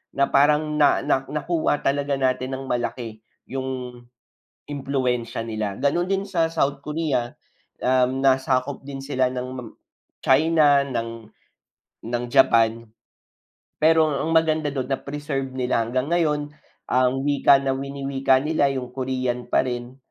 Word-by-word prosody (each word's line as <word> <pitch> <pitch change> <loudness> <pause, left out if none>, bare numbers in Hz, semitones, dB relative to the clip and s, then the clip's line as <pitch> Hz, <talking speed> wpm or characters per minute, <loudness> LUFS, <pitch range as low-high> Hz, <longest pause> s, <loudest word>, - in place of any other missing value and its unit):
na 140 0 +3
parang 150 +2 +3
na 145 - +5
na 135 - +1
nakuha 150 +1 -1
talaga 140 0 0
natin 130 0 0
ng 135 - -7
malaki 120 -3 -3 0.3
'yong 130 -2 -5 0.7
impluwensya 130 -5 -2
nila. 110 -3 -3
Gano'n 160 +5 +1
din 195 0 0
sa 175 -5 +1
South 140 -3 0
Korea, 150 -6 -1 0.5
um, 130 +1 +2
nasakop 130 0 +1
din 135 -1 -7
sila 130 -2 0
ng 125 -2 -6 0.5
China, 145 0 +4
ng 115 -4 -5 0.8
ng 120 +1 -2
Japan, 115 0 +4 1.0
pero 160 0 +5
ang 155 +4 -2
maganda 155 -2 +2
do'n 130 -2 -3
na-preserve 140 -2 -4
nila 125 -2 0
hanggang 130 +4 -2
ngayon 150 -3 0 0.4
ang 130 +1 +2
wika 140 -1 +5
na 135 -1 -1
winiwika 135 -1 0
nila, 150 -1 +1
'yong 125 -2 -5
Korean 130 -2 -2
pa - - +3
rin. 125 0 -5
135 Hz, 130 wpm, -23 LUFS, 125-145 Hz, 1.0 s, na